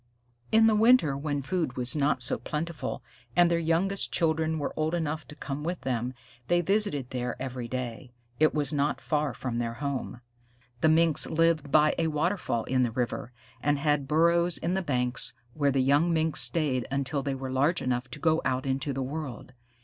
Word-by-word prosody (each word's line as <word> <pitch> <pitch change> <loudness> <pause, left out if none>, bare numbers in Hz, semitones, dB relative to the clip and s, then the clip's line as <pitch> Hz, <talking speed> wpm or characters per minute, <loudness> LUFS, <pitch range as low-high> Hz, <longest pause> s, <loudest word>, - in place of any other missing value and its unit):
In 225 0 +6
the 225 - +5
winter, 215 - +4
when 145 0 -3
food 155 -3 -2
was 125 +4 +2
not 145 -3 +1
so 125 - -1
plentiful 150 +4 -4 0.3
and 175 0 +5
their 170 - +2
youngest 170 +4 0
children 160 -1 +1
were 145 - -3
old 155 +2 0
enough 160 -2 -3
to 150 - -11
come 145 0 -5
with 175 +2 -3
them, 125 0 -2 0.3
they 175 - +3
visited 175 - 0
there 125 -2 -3
every 130 -2 -5
day. 125 0 -5 0.3
It 155 0 +5
was 150 -1 -1
not 145 0 0
far 150 -2 -1
from 120 -2 -3
their 115 -1 -3
home. 140 -3 -4 0.6
The 160 - +3
Minks 160 -1 +4
lived 160 -3 +1
by 155 0 +5
a 165 - +2
waterfall 155 - -1
in 130 0 0
the 125 - +2
river, 120 +1 -3 0.3
and 145 0 +1
had 145 -1 0
burrows 170 +3 +3
in 170 +2 -2
the 190 - 0
banks, 125 -6 +1 0.2
where 145 -1 +1
the 135 -1 +2
young 145 +6 +3
Minks 160 -1 +2
stayed 140 -7 +1
until 140 +1 -1
they 135 0 -2
were 130 0 -5
large 145 +7 +2
enough 125 0 -2
to 130 - -8
go 160 +1 +2
out 130 0 -1
into 135 +1 -1
the 135 0 -2
world. 135 -2 -6
145 Hz, 190 wpm, -28 LUFS, 130-165 Hz, 0.6 s, In